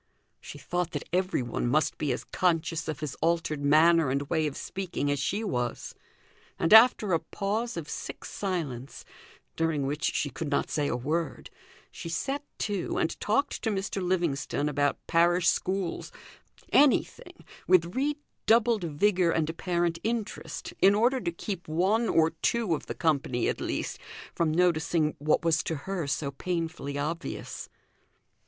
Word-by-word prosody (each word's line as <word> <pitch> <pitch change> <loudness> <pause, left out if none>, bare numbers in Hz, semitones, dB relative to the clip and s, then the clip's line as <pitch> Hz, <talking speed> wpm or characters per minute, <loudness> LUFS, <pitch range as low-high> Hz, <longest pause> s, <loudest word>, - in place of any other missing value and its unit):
She - - -10
thought 175 -1 -2
that - - -4
everyone 180 -11 0
must 150 +5 +1
be 150 -3 0
as 125 - -3
conscious 165 -2 0
of 155 -2 -4
his 150 -3 -3
altered 165 -3 0
manner 160 +1 +5
and 140 +2 0
way 160 -2 +2
of 145 - -5
speaking 180 -7 -3
as 145 - 0
she 185 +11 -1
was, 125 - -3 0.6
and 165 - +2
after 220 -4 +7
a 165 - +3
pause 215 +5 -3
of 160 -3 -5
sick - - -6
silence, 150 -10 -4 0.5
during 160 -4 0
which 145 +2 -2
she 145 - 0
could 150 +4 -4
not 140 - 0
say 145 -2 0
a - - -1
word, 155 +6 -3 0.4
she 165 - -7
set 275 - -2
to 200 -4 -2
and - - -1
talked 250 +7 0
to 225 - 0
Mr. 195 -1 -2
Livingstone 170 -6 0
about 145 -1 +1
parish 170 0 +3
schools, 185 -1 -1 0.6
anything, 290 -2 +2 0.2
with 175 -1 +4
redoubled 240 - +1
vigour 180 +3 +2
and 160 -1 +1
apparent 170 0 -1
interest, 225 -1 -4
in 195 +1 +6
order 245 +4 +2
to 170 - -1
keep 180 +1 -6
one 195 +9 +1
or 160 0 +4
two 230 -7 +1
of 155 - -4
the - - -4
company, 140 -7 0
at - - -2
least, - - -3 0.3
from 165 -2 +1
noticing 160 -2 +2
what 155 +3 +1
was 165 -1 +3
to 165 - -3
her 175 +1 -4
so 140 0 -1
painfully 165 -2 -3
obvious. 160 +4 -4
170 Hz, 155 wpm, -28 LUFS, 150-195 Hz, 0.6 s, after